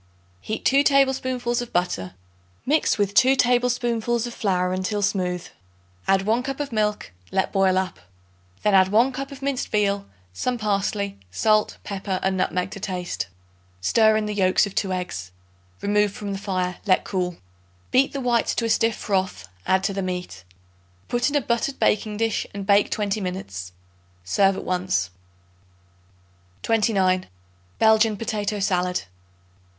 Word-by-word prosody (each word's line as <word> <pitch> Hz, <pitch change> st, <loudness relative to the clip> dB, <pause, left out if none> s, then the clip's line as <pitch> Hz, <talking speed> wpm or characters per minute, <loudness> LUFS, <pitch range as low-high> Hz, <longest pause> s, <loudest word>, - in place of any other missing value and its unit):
Heat 215 Hz, -, -5 dB
2 275 Hz, +1 st, +5 dB
tablespoonfuls 260 Hz, -4 st, +2 dB
of 240 Hz, -, -7 dB
butter. 135 Hz, -, -1 dB, 0.5 s
Mix 305 Hz, +4 st, +2 dB
with 200 Hz, -1 st, 0 dB
2 260 Hz, +4 st, +5 dB
tablespoonfuls 240 Hz, -2 st, +1 dB
of 240 Hz, -, -6 dB
flour 180 Hz, -5 st, 0 dB
until 195 Hz, +3 st, -1 dB
smooth; 180 Hz, -3 st, -1 dB, 0.6 s
add 195 Hz, 0 st, +3 dB
1 225 Hz, +4 st, +2 dB
cup 270 Hz, +2 st, -5 dB
of 290 Hz, -2 st, -3 dB
milk; 210 Hz, -, -1 dB, 0.2 s
let 190 Hz, -, 0 dB
boil 190 Hz, -2 st, +3 dB
up. 185 Hz, -, -2 dB, 0.6 s
Then 210 Hz, -, +3 dB
add 190 Hz, -1 st, +6 dB
1 230 Hz, +7 st, +3 dB
cup 275 Hz, +2 st, -5 dB
of 275 Hz, -1 st, -10 dB
minced 275 Hz, -2 st, -1 dB
veal, 200 Hz, -1 st, 0 dB, 0.3 s
some 245 Hz, -, -1 dB
parsley, 200 Hz, -, -1 dB
salt, 215 Hz, -, +2 dB
pepper 195 Hz, -2 st, -3 dB
and 190 Hz, 0 st, +1 dB
nutmeg 180 Hz, -1 st, -1 dB
to 200 Hz, -, -7 dB
taste. 180 Hz, -, -3 dB, 0.5 s
Stir 220 Hz, -, +4 dB
in 215 Hz, -, -1 dB
the 210 Hz, -, -3 dB
yolks 190 Hz, 0 st, +3 dB
of 200 Hz, -, -7 dB
2 195 Hz, -2 st, -1 dB
eggs. 180 Hz, -, -4 dB, 0.5 s
Remove 205 Hz, 0 st, +2 dB
from 205 Hz, 0 st, -6 dB
the 195 Hz, -, -4 dB
fire; 185 Hz, -2 st, -2 dB
let 185 Hz, -, +4 dB
cool. 180 Hz, -3 st, -2 dB, 0.5 s
Beat 265 Hz, +2 st, +4 dB
the 275 Hz, -, -4 dB
whites 240 Hz, -2 st, +1 dB
to 230 Hz, -, 0 dB
a -, -, -1 dB
stiff 225 Hz, 0 st, +2 dB
froth; 185 Hz, -, -2 dB, 0.2 s
add 190 Hz, 0 st, +3 dB
to 195 Hz, -, 0 dB
the 195 Hz, -, -2 dB
meat. 180 Hz, -, -5 dB, 0.7 s
Put 240 Hz, +3 st, +1 dB
in 290 Hz, -, -4 dB
a 290 Hz, -, +3 dB
buttered 235 Hz, +3 st, -1 dB
baking 210 Hz, 0 st, +1 dB
dish 225 Hz, 0 st, 0 dB
and 200 Hz, -1 st, -4 dB
bake 200 Hz, 0 st, +4 dB
twenty 210 Hz, 0 st, -1 dB
minutes. 95 Hz, -, -5 dB, 0.5 s
Serve 195 Hz, -, +2 dB
at -, -, -6 dB
once. 180 Hz, -, 0 dB, 1.5 s
29. 195 Hz, -5 st, +2 dB, 0.5 s
Belgian 220 Hz, -1 st, +4 dB
Potato 210 Hz, -1 st, -2 dB
Salad. 180 Hz, -2 st, 0 dB
205 Hz, 155 wpm, -24 LUFS, 185-230 Hz, 1.5 s, add